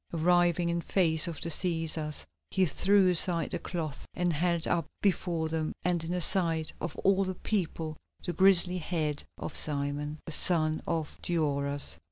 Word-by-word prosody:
Arriving 175 +1 +2
in 170 0 -1
face 165 -2 +3
of 165 -4 -5
the 170 - -3
Cæsars 160 -3 0 0.2
he 190 - +2
threw 190 +4 +3
aside 170 -1 +3
the - - -3
cloth 160 -5 -5
and 175 -1 0
held 170 +1 0
up 165 -3 0
before 175 -4 0
them 160 -1 -2
and 175 -2 0
in 175 +2 -2
sight 165 -3 +1
of 170 - -4
all 195 0 +3
the 185 -1 -3
people 165 -6 -2 0.3
the 175 - -2
grizzly 185 0 +4
head 155 -3 -2
of - - -6
Simon, 145 0 -1
the - - -6
son 155 -1 +1
of 160 -3 -3
Gioras. 145 - 0
170 Hz, 160 wpm, -29 LUFS, 155-180 Hz, 0.3 s, grizzly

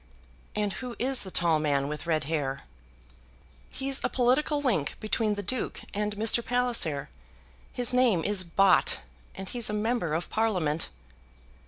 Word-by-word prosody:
"And 210 -2 0
who 250 -2 -7
is 260 +2 +2
the 190 - -3
tall 170 -3 +2
man 140 -2 0
with 150 +3 -6
red 160 -2 +1
hair?" 140 -2 -2 1.1
"He's 270 0 -2
a - - +1
political 265 +4 +1
link 215 - 0
between 215 0 0
the 205 - -5
Duke 255 +5 -3
and 210 0 -2
Mr. 225 +3 +3
Palliser. 235 - +1 0.6
His 245 0 +1
name 240 -10 +3
is 205 -2 +2
Bott, 185 +2 +3 0.3
and 190 0 -7
he's 235 +1 0
a - - -3
Member 210 -7 -1
of 165 - -4
Parliament." 180 -9 0
210 Hz, 150 wpm, -27 LUFS, 165-245 Hz, 1.1 s, Mr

